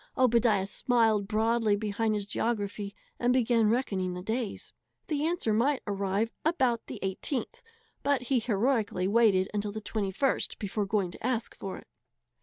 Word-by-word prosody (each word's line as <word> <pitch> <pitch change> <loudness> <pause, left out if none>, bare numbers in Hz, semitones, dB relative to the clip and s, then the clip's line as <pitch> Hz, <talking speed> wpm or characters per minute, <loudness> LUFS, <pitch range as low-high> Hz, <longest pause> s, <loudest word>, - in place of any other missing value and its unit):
Obadiah 235 -5 +3
smiled 220 -1 +2
broadly 220 0 +2
behind 215 +1 -1
his 205 -1 -2
geography 205 -2 -2 0.2
and 245 0 +2
began 235 -3 +3
reckoning 195 -7 0
the 180 - -6
days. 225 +1 -3 0.4
The 300 -2 0
answer 335 -10 0
might 260 +5 +2
arrive 200 +2 -1
about 260 -8 +1
the - - -6
18th, 240 - -3 0.4
but 280 -3 +1
he 250 0 +2
heroically 220 -4 0
waited 200 -3 +4
until 205 0 -1
the 220 - -5
21st 215 +4 -1
before 205 0 -2
going 195 -3 0
to - - -12
ask 235 -1 -1
for 195 -1 -6
it. - - -13
220 Hz, 150 wpm, -29 LUFS, 200-240 Hz, 0.4 s, waited